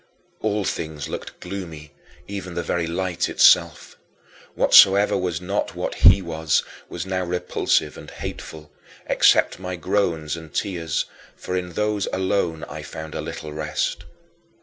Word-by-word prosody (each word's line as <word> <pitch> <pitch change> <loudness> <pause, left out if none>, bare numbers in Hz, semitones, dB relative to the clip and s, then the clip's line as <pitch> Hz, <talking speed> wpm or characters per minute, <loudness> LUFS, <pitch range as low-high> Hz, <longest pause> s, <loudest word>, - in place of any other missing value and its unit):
All 105 -1 0
things 80 -6 -4
looked - - -7
gloomy, 85 -6 -7 0.3
even 95 -3 -6
the 85 - -2
very 85 -1 -1
light 90 +1 -1
itself. - - +4 0.6
Whatsoever 100 +2 +6
was 90 -4 -1
not 95 +3 -2
what - - -3
he 90 +2 +6
was, 80 -3 0 0.3
was - - -5
now 95 -1 -1
repulsive 90 0 0
and - - -11
hateful, 75 -2 -8 0.3
except - - +4
my 90 -1 -4
groans 85 -4 -1
and 80 -2 -10
tears, 85 -1 -2 0.3
for 90 - -5
in 90 -1 -3
those 105 0 0
alone 95 -4 -1
I - - -7
found 80 -1 -8
a - - -3
little 75 -1 -7
rest. 75 0 -2
90 Hz, 140 wpm, -23 LUFS, 80-95 Hz, 0.6 s, Whatsoever